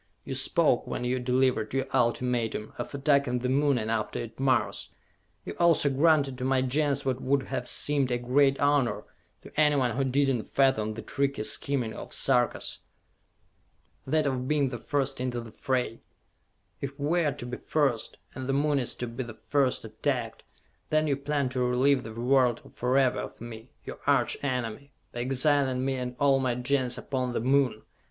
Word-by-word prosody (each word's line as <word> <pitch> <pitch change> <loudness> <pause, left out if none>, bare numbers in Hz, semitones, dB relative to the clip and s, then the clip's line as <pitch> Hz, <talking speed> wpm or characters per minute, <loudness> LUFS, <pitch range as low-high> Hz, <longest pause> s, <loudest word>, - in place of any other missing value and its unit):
You - - -5
spoke, - - +2
when - - -3
you 125 +1 0
delivered 125 -2 +1
your 135 - +1
ultimatum, 120 -2 0
of - - -4
attacking 140 -3 +2
the 125 +1 -2
Moon, 140 0 +2
and 110 -1 -2
after 110 -2 -2
it 115 0 -7
Mars! 135 -1 +1 0.6
You - - -5
also 165 -4 +4
granted 140 -2 +3
to - - -3
my 130 0 +2
Gens 140 +2 0
what 130 -1 -1
would 135 +1 +1
have 125 - -4
seemed 140 -3 +1
a 120 - +1
great 135 +3 +2
honor 145 -3 +2 0.4
to - - -12
anyone 145 -5 +3
who 135 - +1
did 135 0 +2
not 115 - -5
fathom 110 -6 +2
the 110 - -7
tricky 140 -1 -1
scheming 125 -1 0
of - - -8
the - - 0
Sarkas! 125 -3 +1 1.3
that 155 +2 +2
of 130 -2 -1
being 145 -2 +2
the 120 -2 -6
first 135 0 -2
into 125 -1 -2
the 115 -1 -9
fray! 125 -2 -2 0.8
If 140 0 -6
we 165 +5 +1
are 150 - +2
to 120 - -8
be 125 0 -5
first, 140 -7 -1 0.2
and 130 0 -6
the - - +2
Moon 145 +1 +2
is 125 - -3
to 125 - -4
be 115 +3 -5
the 110 -2 -10
first 135 -5 +1
attacked, 115 +2 -3 0.5
then 155 0 +2
you 145 -2 +1
plan 140 -1 -1
to 130 0 -3
relieve 125 +2 +3
the 115 - -8
world 125 0 +1
forever 130 +1 +2
of - - -7
me, 115 +1 -9 0.2
your - - -7
arch 135 -4 +3
enemy, 130 +1 -3 0.2
by 120 - -6
exiling 130 0 +1
me 135 - 0
and 125 -1 -4
all 140 -2 +4
my 130 -2 0
Gens 125 0 0
upon 130 -3 -3
the - - 0
Moon! 130 -2 +1
130 Hz, 185 wpm, -28 LUFS, 125-140 Hz, 1.3 s, also